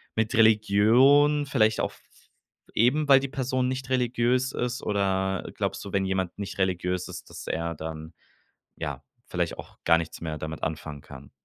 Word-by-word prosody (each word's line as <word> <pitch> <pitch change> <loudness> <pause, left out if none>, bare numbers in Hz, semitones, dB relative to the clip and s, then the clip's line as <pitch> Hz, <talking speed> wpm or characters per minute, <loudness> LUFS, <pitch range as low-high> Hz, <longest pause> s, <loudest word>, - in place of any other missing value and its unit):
mit 110 0 0
Religion, 115 +7 +5
vielleicht 110 -6 +2
auch - - -1
f - - -19
f - - -26 0.4
eben, 140 +7 +2
weil 135 - +8
die 135 - -3
Person 130 -1 -1
nicht 130 0 -4
religiös 125 0 +1
ist 125 +1 -2
oder 95 -2 0
glaubst - - -3
du, 100 - -8
wenn 95 -1 +1
jemand 95 -2 -2
nicht 100 -1 -5
religiös 90 -1 -1
ist, - - -9
dass - - -9
er 85 0 -2
dann, 80 +1 -7 0.6
ja, 70 -2 -5 0.2
vielleicht - - -2
auch - - -11
gar 85 0 +6
nichts 85 - -5
mehr 80 -2 -4
damit 80 +1 -6
anfangen 75 -2 -4
kann? 70 -1 -13
100 Hz, 175 wpm, -26 LUFS, 85-125 Hz, 0.6 s, weil